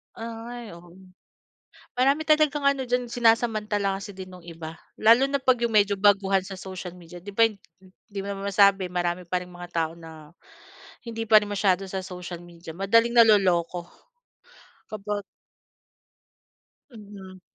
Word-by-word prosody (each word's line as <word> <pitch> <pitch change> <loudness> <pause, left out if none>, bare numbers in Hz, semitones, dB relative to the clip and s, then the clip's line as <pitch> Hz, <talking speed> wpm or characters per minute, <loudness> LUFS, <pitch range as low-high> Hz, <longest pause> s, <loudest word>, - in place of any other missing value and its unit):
Ay, 230 0 -8
oo, 170 +1 -14 1.0
marami 275 +4 +3
talagang 305 -1 +3
ano 275 -2 +2
diyan 245 0 -1
sinasamantala 215 -4 +1
kasi 200 0 -9
din 185 0 -9
nung 180 -2 -13
iba. 165 -1 -9 0.2
Lalo 230 +5 +6
na 275 0 -1
'pag 255 -2 +3
'yong 235 -1 0
medyo 205 -1 +4
baguhan 195 -1 +3
sa 190 -1 -8
social 185 -2 -7
media 175 0 -13
'di 200 +4 -10
ba 225 +2 +5
hin 210 -3 -12 0.2
hindi 195 +2 -11
mo 200 0 -5
masabi 200 -1 +4
marami 175 0 -2
pa 180 +1 -2
ring 180 - -10
mga 175 0 -10
tao 165 -1 0
na 160 -2 -12 0.8
hindi 225 -1 -5
pa 215 - +7
rin 205 - -6
masyado 195 -2 +1
sa 190 0 -4
social 180 -2 -8
media 170 -1 -11
madaling 230 +6 +2
naloloko 185 -6 +4 1.0
kapag 205 -1 -4 1.7
Mhm, 200 -4 -12
200 Hz, 145 wpm, -25 LUFS, 180-225 Hz, 1.7 s, pa